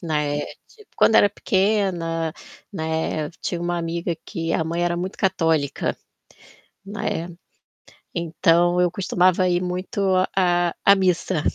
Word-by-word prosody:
né, 150 -3 -1 0.3
tipo, 430 -3 -20
quando 225 - +5
era 205 - +6
pequena, 185 -6 0 0.4
né, 160 -2 -2
tinha 175 - -3
uma 175 0 -1
amiga 170 0 -2
que 165 -4 -3
a - - +1
mãe 170 +2 -2
era 175 0 0
muito 185 +2 -5
católica, 165 -7 0 0.9
né. 195 -4 -3 0.9
Então 170 +1 +2
eu 180 -1 +3
costumava 185 0 +2
ir 175 0 +1
muito 180 +2 -4 0.3
à 175 -2 +2
à 200 - +7
missa, 185 -3 0
né. - - -1
175 Hz, 130 wpm, -22 LUFS, 165-185 Hz, 0.9 s, à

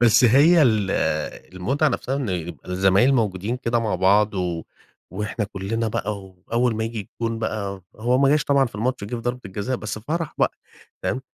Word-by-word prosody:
بس 120 +1 +6
هي 150 +8 +6
ال 110 -6 +3 0.6
المتعة 135 - +1
نفسها 135 0 -2
إن 135 -6 -2
يبقى 85 -1 -5
الزمايل 95 +8 +4
موجودين 105 0 0
كده 120 -2 0
مع 110 -3 -1
بعض 100 +3 +3
و 90 -3 -2 0.5
وإحنا 105 +2 -2
كلنا 105 +3 -2
بقى 105 -1 -2
وأول 110 +6 -1
ما 110 - -1
ييجي 115 -1 -4 0.2
الجون 115 0 -1
بقى 100 -4 -3
هو 120 +4 +1
ما 135 0 +4
جاش 150 -2 +3
طبعًا 140 -1 +3
في 120 - -11
الماتش، 120 0 -1
جه 110 - -5
في 115 - -5
ضربة 125 +1 -2
الجزاء 105 +7 -3
بس 110 -1 -5
فرح 160 +7 -3
بقى، - - +2 0.5
تمام؟ 130 - -1
110 Hz, 185 wpm, -23 LUFS, 100-125 Hz, 0.6 s, بس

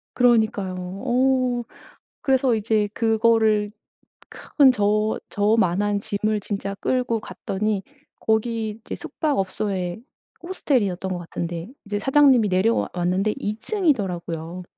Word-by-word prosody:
그러니까요. 220 -6 +2 0.3
어. 255 -1 +1 0.6
그래서 265 -3 +2
이제 215 -1 +1
그거를 220 -2 +2 0.6
큰 280 -3 +3
저 215 -1 +1
저 210 +2 +2
만한 205 +1 +1
짐을 210 +1 -1
진짜 200 -1 -4
끌고 245 0 -1
갔더니 195 +2 -3 0.4
거기 220 0 0
이제 - - -8
숙박업소에 195 - -2 0.5
호스텔이었던 220 - -1
것 180 - -2
같은데 170 +1 -5 0.2
이제 205 0 -2
사장님이 270 -3 +4
내려와 190 +5 +1
왔는데 185 +4 0
2 210 +1 -3
층이더라고요. 180 - -1
215 Hz, 265 characters per minute, -23 LUFS, 195-240 Hz, 0.6 s, 사장님이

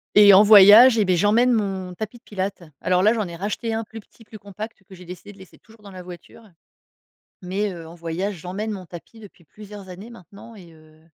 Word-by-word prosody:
Et 205 -1 +7
en 195 +2 +7
voyage, 215 +4 +7
eh 215 - +1
beh 185 -1 +1
j'emmène 225 +7 +2
mon 195 -4 -4
tapis 220 +5 -8
de 235 - -27
pilates. 195 -4 -6 0.2
Alors 180 0 0
là, 215 +4 +3
j'en 215 -4 -4
ai 170 - -9
racheté 215 +4 -5
un 225 0 -4
plus 225 +1 -12
petit, 225 +2 -23
plus 215 - -13
compact, 205 +2 -10
que 195 - -18
j'ai 180 -1 -14
décidé 180 +4 -12
de 200 - -19
laisser 190 -1 -17
toujours 225 -1 -23
dans 200 - -13
la 185 -1 -11
voiture. 180 +5 -14 1.0
Mais, 195 +3 -3
heu, 170 -2 -11
en 165 - -13
voyage, 175 +4 -5
j'emmène 195 +6 -6
mon 190 -3 -8
tapis 180 +6 -14
depuis 200 -5 -17
plusieurs 205 +3 -14
années 190 +6 -12
maintenant, 205 +2 -16
et 175 -4 -16
heu 155 0 -22
200 Hz, 225 wpm, -21 LUFS, 180-215 Hz, 1.0 s, Et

